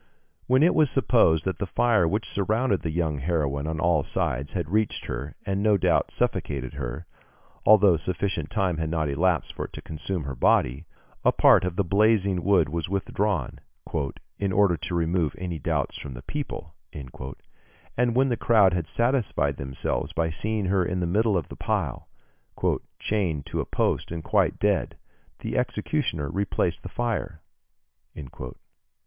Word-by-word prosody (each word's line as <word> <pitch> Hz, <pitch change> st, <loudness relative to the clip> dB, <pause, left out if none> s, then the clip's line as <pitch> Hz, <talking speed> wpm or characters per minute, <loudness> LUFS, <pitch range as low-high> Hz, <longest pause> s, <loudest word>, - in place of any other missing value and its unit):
When 130 Hz, +3 st, +4 dB
it 175 Hz, -, +5 dB
was 155 Hz, -3 st, +4 dB
supposed 80 Hz, -, +3 dB
that 95 Hz, -, -2 dB
the 100 Hz, -, -2 dB
fire 110 Hz, -3 st, +3 dB
which 105 Hz, +6 st, -1 dB
surrounded 110 Hz, +1 st, 0 dB
the 85 Hz, -, -3 dB
young 80 Hz, -3 st, -1 dB
heroine 70 Hz, -2 st, -1 dB
on 80 Hz, 0 st, -2 dB
all 85 Hz, -2 st, +3 dB
sides 70 Hz, 0 st, -2 dB
had 85 Hz, -5 st, -2 dB
reached 110 Hz, +1 st, 0 dB
her 65 Hz, +4 st, -5 dB
and 100 Hz, 0 st, -1 dB
no 105 Hz, -1 st, +4 dB
doubt -, -, +2 dB
suffocated 65 Hz, -3 st, -2 dB
her, 70 Hz, +4 st, -5 dB, 0.6 s
although 100 Hz, -5 st, +7 dB
sufficient 90 Hz, -1 st, -2 dB
time 95 Hz, -6 st, 0 dB
had 80 Hz, -1 st, -2 dB
not 80 Hz, -2 st, 0 dB
elapsed 85 Hz, +6 st, +1 dB
for -, -, -4 dB
it -, -, -12 dB
to -, -, -7 dB
consume 80 Hz, +2 st, -3 dB
her 70 Hz, -1 st, -5 dB
body, 65 Hz, +5 st, +2 dB, 0.4 s
a -, -, +5 dB
part -, -, +5 dB
of 90 Hz, -1 st, -2 dB
the 100 Hz, -, +1 dB
blazing 100 Hz, -1 st, +2 dB
wood 95 Hz, -5 st, +4 dB
was 85 Hz, +2 st, -3 dB
withdrawn, 100 Hz, -1 st, -1 dB, 0.8 s
"in 100 Hz, -1 st, 0 dB
order 95 Hz, -2 st, +4 dB
to 80 Hz, +3 st, -4 dB
remove 85 Hz, -1 st, 0 dB
any 90 Hz, -3 st, -4 dB
doubts -, -, -1 dB
from 70 Hz, -3 st, -7 dB
the -, -, -9 dB
people," 135 Hz, -, -5 dB, 0.2 s
and 70 Hz, -, -6 dB
when 135 Hz, +1 st, +3 dB
the 120 Hz, -, +1 dB
crowd 105 Hz, -6 st, +4 dB
had 85 Hz, -3 st, -1 dB
satisfied 115 Hz, -, +1 dB
themselves 65 Hz, +1 st, -3 dB
by 80 Hz, -1 st, 0 dB
seeing 105 Hz, +5 st, -2 dB
her 95 Hz, 0 st, +2 dB
in 90 Hz, +1 st, -2 dB
the 90 Hz, -, 0 dB
middle 105 Hz, +3 st, +2 dB
of 85 Hz, -, -3 dB
the -, -, -8 dB
pile, -, -, -2 dB, 0.9 s
"chained 90 Hz, -9 st, -1 dB
to -, -, -4 dB
the -, -, -1 dB
post -, -, -1 dB
and 85 Hz, -1 st, -4 dB
quite -, -, +2 dB
dead, -, -, 0 dB, 0.4 s
the -, -, -4 dB
executioner 120 Hz, -, -1 dB
replaced 95 Hz, +4 st, -1 dB
the -, -, -7 dB
fire...." 115 Hz, -9 st, -3 dB
90 Hz, 165 wpm, -26 LUFS, 80-105 Hz, 0.9 s, although